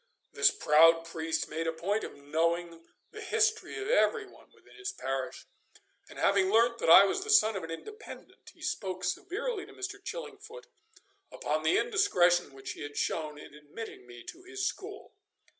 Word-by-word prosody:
This - - +5
proud 165 +2 +5
priest 165 -1 -3
made 165 +1 -3
a - - +1
point 195 +7 -2
of - - -7
knowing 165 +3 -2 0.2
the - - -9
history 440 0 0
of 400 - -4
every 465 -2 +2
one - - -19
within - - -22
his 400 0 -5
parish, 135 - -4 0.6
and - - -13
having 195 -1 +3
learnt 235 +2 +3
that - - 0
I 190 - +10
was 375 - -1
the 435 - -8
son 220 - +5
of 195 - -4
an 165 - -7
Independent, 425 - -10
he - - -17
spoke 185 -3 -3
severely 390 +3 -3
to 415 - -14
Mr. 400 +1 -7
Chillingfoot 460 0 -8 0.7
upon 155 +1 -2
the 160 +1 +3
indiscretion 180 - +2
which 135 - -7
he - - -9
had 145 0 -7
shown 155 -2 -2
in 150 - -12
admitting 150 - -10
me 120 -1 -12
to 355 - -10
his 375 +2 -5
school. 410 +1 -6
195 Hz, 175 wpm, -30 LUFS, -, 0.7 s, I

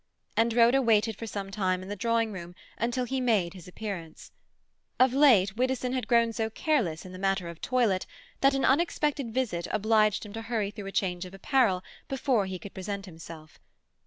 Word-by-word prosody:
And 230 +1 +3
Rhoda 240 +3 +5
waited 225 -2 +3
for 225 - -7
some 200 -2 -5
time 185 -2 0
in - - -9
the 205 - -4
drawing 230 +1 0
room 175 -2 -8 0.2
until 240 +2 -1
he 265 +2 -2
made 210 -9 +1
his 180 -3 -12
appearance. 180 -5 -7 0.7
Of 255 0 +5
late 230 -9 +5
Widdowson 255 +1 0
had 255 -3 -2
grown 235 -1 +3
so 220 0 -1
careless 225 - 0
in 185 - -9
the 185 - -9
matter 195 -2 0
of 170 -1 -10
toilet, 235 -7 +1 0.3
that 275 0 +4
an 270 - +1
unexpected 295 -3 +1
visit 220 -9 -1
obliged 215 0 +2
him 205 - -10
to 225 - -5
hurry 225 -3 -2
through 205 -2 -8
a - - -5
change 180 -2 -1
of 185 +1 -10
apparel 195 -4 +2 0.2
before 255 -6 +1
he 190 -1 -4
could 190 +3 -10
present 195 +1 -5
himself. 165 -3 -12
215 Hz, 190 wpm, -28 LUFS, 190-245 Hz, 0.7 s, Rhoda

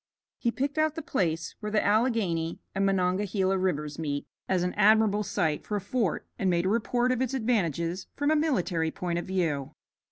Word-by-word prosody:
He 235 - +1
picked 275 +5 -2
out 310 -1 +2
the 325 - -5
place 165 - -1
where 210 -1 -4
the 210 - +2
Alleghany 205 -7 +1
and 195 - 0
Monongahela 190 +1 +1
Rivers 150 -5 -1
meet 145 -3 -2 0.2
as 185 -2 +2
an 180 - -1
admirable 210 0 +4
site 165 -7 -1
for 210 - -3
a - - +1
fort 205 -1 -1
and 190 - +2
made 175 0 +1
a - - +2
report 240 +3 +1
of 255 -1 0
its 260 0 0
advantages 185 - 0
from 290 +1 +1
a - - +4
military 240 - +1
point 175 +1 -2
of - - -6
view. 165 -8 -1
195 Hz, 190 wpm, -28 LUFS, 170-230 Hz, 0.2 s, admirable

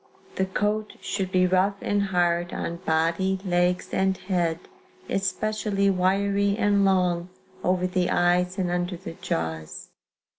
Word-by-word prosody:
"The 190 - -1
coat 210 +2 -1
should 190 -2 -3
be 185 -1 +4
rough 185 +2 +2
and 205 0 0
hard 175 -2 +1
on 170 - -3
body, 170 +4 +1
legs 180 0 +1
and 190 0 +1
head; 175 -4 0 0.5
especially 200 +1 0
wiry 200 +2 +1
and 205 -2 +3
long 180 -2 +2 0.3
over 180 0 +1
the 180 -1 0
eyes 180 +1 +2
and 180 -2 0
under 175 0 -1
the 170 -1 -8
jaws. 80 -1 -4
185 Hz, 135 wpm, -25 LUFS, 175-195 Hz, 0.5 s, be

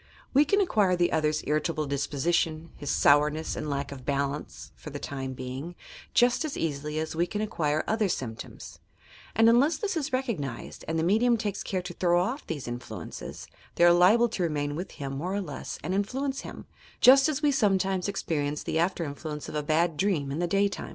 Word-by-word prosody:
We 285 +3 +6
can 400 +7 +2
acquire 210 - +3
the 175 0 +2
other's 155 -1 +1
irritable 155 +1 0
disposition, 155 +3 -1
his 145 - -6
sourness 150 +2 +3
and 155 - -4
lack 140 0 -2
of 135 -2 -8
balance, 140 +1 -3
for - - -9
the 145 - -6
time 135 -2 -5
being, 130 +7 -6 0.4
just 245 +5 +4
as 305 -3 -4
easily 150 -1 -2
as 160 0 -3
we 170 +2 +1
can 210 - -4
acquire 155 -8 0
other 220 -2 +1
symptoms; 115 -8 -6 0.6
and 225 +1 +5
unless 250 +8 +4
this 415 -4 -2
is 310 -2 -2
recognized 210 - -3
and 160 - -1
the 160 - +1
medium 230 +7 +3
takes 205 -2 -3
care 185 -2 -2
to 180 0 -6
throw 175 0 +2
off 240 +11 -2
these 145 -6 -4
influences, 120 0 -7 0.3
they - - +3
are 175 0 +8
liable 205 +7 +5
to 210 - -4
remain 145 -3 -1
with 180 +4 -5
him 135 -1 -5
more 180 +8 -3
or - - 0
less 150 -8 -6
and 180 +5 -2
influence 265 +8 -1
hira - - -9 0.2
— - - -26
just 270 +3 +7
as 305 0 -2
we 295 - +4
sometimes 195 -6 +1
experience 150 -7 -2
the 160 - -1
after 175 0 +1
influence 150 0 -6
of - - -7
a 150 - 0
bad 160 +2 +1
dream 170 -8 0
in 145 - -3
the 175 - +1
day 200 +3 +3
time. 200 - -6
170 Hz, 205 wpm, -28 LUFS, 145-205 Hz, 0.6 s, are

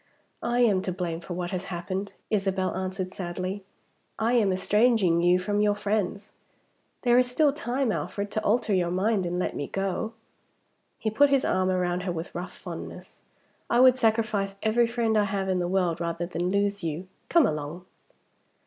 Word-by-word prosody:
"I 240 +1 +1
am 205 -6 +4
to 185 - -3
blame 175 -2 -3
for 175 +1 -7
what 175 0 -3
has 185 0 -3
happened," 190 +3 -4 0.2
Isabel 195 -3 0
answered 185 0 -3
sadly. 185 +2 -4 0.5
"I 225 +2 +1
am 215 -5 +3
estranging 200 -2 +3
you 175 +1 +4
from 205 +3 0
your 205 -1 +3
friends. 205 0 -2 0.7
There 245 -1 +5
is 250 -1 +2
still 285 +3 +3
time, 260 -3 -1
Alfred, 200 -1 -3
to 215 - -2
alter 215 0 +2
your 180 -2 +2
mind 190 +1 +1
and 175 +1 -2
let 180 - -1
me 145 - -3
go." 195 +3 -2 0.8
He 220 - -2
put 285 +6 +5
his 275 -1 +3
arm 185 0 +1
round 180 -1 0
her 180 0 -2
with 165 -1 -5
rough 175 +1 -5
fondness. - - -9 0.5
"I 240 - +3
would 255 0 +7
sacrifice 220 -4 +1
every 230 +2 +3
friend 230 -1 0
I 210 -1 +4
have 195 -1 -2
in 185 -1 +1
the 175 - 0
world 180 -2 0
rather 170 0 -2
than 175 +1 -2
lose 200 0 0
you. 165 +3 -3 0.2
Come 335 -4 +5
along!" 150 +4 -3
195 Hz, 180 wpm, -27 LUFS, 180-220 Hz, 0.8 s, would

